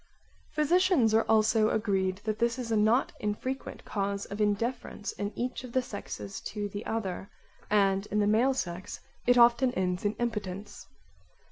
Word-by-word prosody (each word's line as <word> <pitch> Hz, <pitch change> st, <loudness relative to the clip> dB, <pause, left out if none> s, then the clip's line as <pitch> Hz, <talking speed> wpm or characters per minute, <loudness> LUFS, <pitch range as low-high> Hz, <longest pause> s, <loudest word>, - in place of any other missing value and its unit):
Physicians 305 Hz, -, +3 dB
are 225 Hz, +1 st, +4 dB
also 220 Hz, 0 st, +4 dB
agreed 195 Hz, -3 st, 0 dB
that 215 Hz, -1 st, -2 dB
this 235 Hz, +1 st, +1 dB
is 240 Hz, -3 st, -4 dB
not 220 Hz, +4 st, +3 dB
an -, -, -29 dB
infrequent 235 Hz, +6 st, -4 dB
cause 200 Hz, -1 st, -2 dB
of 200 Hz, +2 st, -5 dB
indifference 210 Hz, +1 st, -1 dB
in 205 Hz, 0 st, -4 dB
each 250 Hz, +1 st, -3 dB
of 245 Hz, -2 st, -9 dB
the 260 Hz, -, +3 dB
sexes 105 Hz, -, -7 dB
to 205 Hz, -1 st, -3 dB
the 205 Hz, +2 st, -6 dB
other, 195 Hz, -3 st, -3 dB, 0.4 s
and 195 Hz, -1 st, +2 dB
in 210 Hz, -, -2 dB
the 210 Hz, -, +3 dB
male 235 Hz, +6 st, +3 dB
sex 180 Hz, -4 st, -4 dB, 0.3 s
it 245 Hz, 0 st, +5 dB
often 240 Hz, +2 st, +6 dB
ends 180 Hz, -2 st, -1 dB
in 205 Hz, 0 st, +1 dB
impotence. 210 Hz, -5 st, -4 dB
215 Hz, 160 wpm, -29 LUFS, 200-240 Hz, 0.4 s, often